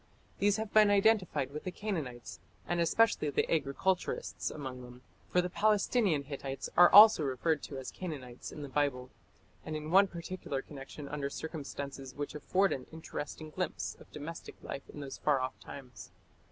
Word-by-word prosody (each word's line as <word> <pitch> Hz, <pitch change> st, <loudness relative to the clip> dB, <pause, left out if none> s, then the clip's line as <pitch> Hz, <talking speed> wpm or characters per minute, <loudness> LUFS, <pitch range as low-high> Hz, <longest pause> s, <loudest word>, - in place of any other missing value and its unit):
These 205 Hz, 0 st, +3 dB
have 220 Hz, -1 st, -4 dB
been 215 Hz, -1 st, +7 dB
identified 195 Hz, -9 st, +3 dB
with 150 Hz, +1 st, -6 dB
the -, -, -3 dB
Canaanites, 160 Hz, -, -5 dB, 0.3 s
and 175 Hz, -, 0 dB
especially 170 Hz, -3 st, +3 dB
the 140 Hz, -, +1 dB
agriculturists 165 Hz, +5 st, -1 dB
among 130 Hz, -4 st, -6 dB
them, 125 Hz, 0 st, -12 dB, 0.3 s
for 180 Hz, -, +3 dB
the 180 Hz, -, -2 dB
Palestinian 210 Hz, -, +2 dB
Hittites 135 Hz, -1 st, -5 dB
are 175 Hz, 0 st, +8 dB
also 210 Hz, -3 st, +10 dB
referred 145 Hz, +2 st, 0 dB
to 140 Hz, -, -7 dB
as 130 Hz, -, -6 dB
Canaanites 135 Hz, -9 st, -7 dB
in 150 Hz, -, -7 dB
the -, -, -5 dB
Bible, 130 Hz, -2 st, -1 dB, 0.5 s
and 155 Hz, -, -5 dB
in 155 Hz, +1 st, -5 dB
one 195 Hz, +2 st, +7 dB
particular 170 Hz, -5 st, -5 dB
connection 140 Hz, 0 st, -9 dB
under 140 Hz, -1 st, -3 dB
circumstances 140 Hz, -4 st, -6 dB
which 145 Hz, 0 st, -4 dB
afford 185 Hz, +4 st, +1 dB
an 130 Hz, -, -6 dB
interesting 155 Hz, -1 st, -6 dB
glimpse -, -, -3 dB
of -, -, -16 dB
domestic 150 Hz, +3 st, -7 dB
life 135 Hz, -, -7 dB
in 145 Hz, -, -8 dB
those 135 Hz, -1 st, -7 dB
far 145 Hz, -3 st, +2 dB
off 130 Hz, 0 st, -4 dB
times. 130 Hz, -3 st, -10 dB
150 Hz, 165 wpm, -32 LUFS, 135-185 Hz, 0.5 s, also